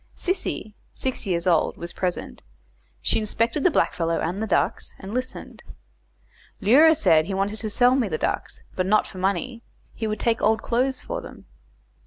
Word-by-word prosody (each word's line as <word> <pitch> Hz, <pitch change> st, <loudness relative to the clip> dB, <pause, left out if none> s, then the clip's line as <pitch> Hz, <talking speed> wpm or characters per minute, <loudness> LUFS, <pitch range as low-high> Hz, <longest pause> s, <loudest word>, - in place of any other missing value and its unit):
Sissy, 370 Hz, -, -2 dB, 0.2 s
six 260 Hz, -4 st, -2 dB
years 170 Hz, -2 st, 0 dB
old, 170 Hz, -3 st, +2 dB
was 170 Hz, 0 st, -6 dB
present; 180 Hz, -2 st, -3 dB, 0.6 s
she -, -, +1 dB
inspected 230 Hz, +5 st, 0 dB
the -, -, +6 dB
blackfellow 165 Hz, -, 0 dB
and 180 Hz, +5 st, -2 dB
the 220 Hz, -, -1 dB
ducks, -, -, 0 dB
and 195 Hz, +2 st, -8 dB
listened. 255 Hz, +1 st, -5 dB, 1.0 s
Leura 300 Hz, +10 st, +6 dB
said 165 Hz, -, +4 dB
he 195 Hz, -, -3 dB
wanted 200 Hz, +3 st, -1 dB
to 220 Hz, -, -3 dB
sell 245 Hz, +4 st, +4 dB
me 260 Hz, -4 st, +1 dB
the 155 Hz, -, -2 dB
ducks, -, -, -3 dB
but 185 Hz, 0 st, 0 dB
not 215 Hz, +2 st, +3 dB
for 185 Hz, -, -10 dB
money; 200 Hz, +6 st, -1 dB, 0.3 s
he 220 Hz, -, -3 dB
would 215 Hz, -1 st, -3 dB
take 230 Hz, -1 st, +1 dB
old 220 Hz, +1 st, +2 dB
clothes 255 Hz, +2 st, 0 dB
for -, -, -5 dB
them. -, -, -12 dB
215 Hz, 175 wpm, -24 LUFS, 185-250 Hz, 1.0 s, the